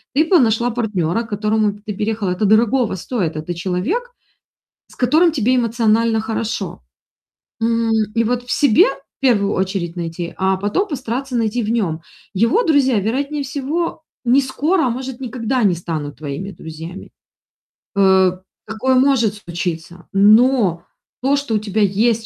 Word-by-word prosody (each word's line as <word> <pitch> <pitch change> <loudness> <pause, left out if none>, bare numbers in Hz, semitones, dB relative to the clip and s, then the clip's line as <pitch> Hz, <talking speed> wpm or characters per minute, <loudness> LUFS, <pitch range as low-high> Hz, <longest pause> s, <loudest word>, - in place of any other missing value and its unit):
Ты 300 - +5
п 350 +1 +4
нашла 235 -1 +2
партнера, 210 -4 -1
к 225 - -13
которому 210 0 0
ты 210 +1 -7
переехала. 210 0 -2
Это 180 +4 0
дорогого 225 +2 +3
стоит. 185 -4 -3
Это 155 +3 -4
человек, 200 - -2 0.8
с - - -18
которым 315 +7 +3
тебе 255 -3 +1
эмоционально 230 -1 +2
хорошо. 220 - -4 0.8
М, 230 0 +1 0.2
и 230 0 +2
вот 245 +2 -1
в 245 - -11
себе, 290 - +5
в - - -10
первую 210 -7 +2
очередь, 185 -2 -2
найти, 170 0 -4
а 190 0 +1
потом 205 - -1
постараться 260 -1 -4
найти 230 +1 0
в 210 - -2
нём. 180 -9 -1 0.3
Его 230 - +3
друзья, 275 - +3
вероятнее 280 +8 -2
всего, 290 +5 -3 0.2
не 250 +3 +4
скоро, 310 +6 0
а - - +1
может, 255 +1 -5
никогда 250 -1 -1
не 190 -3 +4
станут 160 -4 -5
твоими 155 +7 -5
друзьями. 165 +3 -9 0.9
Э, 190 -2 +4 0.4
такое 220 +5 0
может 255 -5 +3
случиться. 175 -2 -6
Но 210 -2 +4 0.4
то, 275 +3 +2
что 280 -5 -2
у - - +2
тебя 210 0 -2
есть 220 +3 +2
220 Hz, 150 wpm, -19 LUFS, 190-255 Hz, 0.9 s, Ты